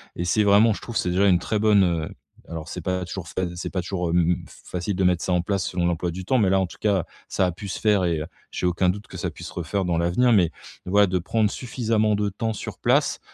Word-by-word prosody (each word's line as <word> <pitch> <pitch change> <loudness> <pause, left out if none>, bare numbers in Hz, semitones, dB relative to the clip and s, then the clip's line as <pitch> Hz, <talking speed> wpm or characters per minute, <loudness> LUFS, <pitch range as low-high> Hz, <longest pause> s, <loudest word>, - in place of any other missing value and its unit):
et 85 - -3
c'est 105 +5 +2
vraiment, 105 +2 +5
je - - -8
trouve, 115 - -4
c'est 90 - 0
déjà 95 +3 +3
une 90 -2 +5
très 105 +4 -2
bonne, 105 -2 +5
heu, 85 -3 0 0.4
alors 80 -1 -6
c'est 90 - -6
pas 90 +1 -2
toujours 85 0 -6
fa 95 - -3
c'est 85 - -4
pas 95 - -2
toujours, 90 -1 -2
mmh, 85 0 +2
facile, 90 +2 -5
de 95 - 0
mettre 90 -1 +2
ça - - -1
en 90 -1 +3
place 95 -1 -1
selon 90 -1 -1
l'emploi 85 0 0
du 90 +2 -6
temps, 130 +5 +2
mais 100 -4 +3
là 95 0 +3
en 95 - +1
tout 90 - -11
cas, 100 -5 +1 0.2
ça 95 - +1
a 90 - 0
pu 95 +4 -8
se 95 - -4
faire 105 -3 +3
et 85 -3 0
heu, - - -3 0.2
j'ai - - -3
aucun 90 +1 +2
doute 100 +3 -3
que - - -10
ça - - -2
puisse - - -9
se - - -12
refaire 90 +3 -2
dans 85 -2 0
l'avenir. 90 +9 +2
Mais 90 -6 +4 0.4
voilà 100 +2 +5
de 90 -1 0
prendre 105 +5 +1
suffisamment 110 -3 0
de 105 0 0
temps 110 +3 -3
sur - - -7
place, - - +2
95 Hz, 275 wpm, -24 LUFS, 90-105 Hz, 0.4 s, vraiment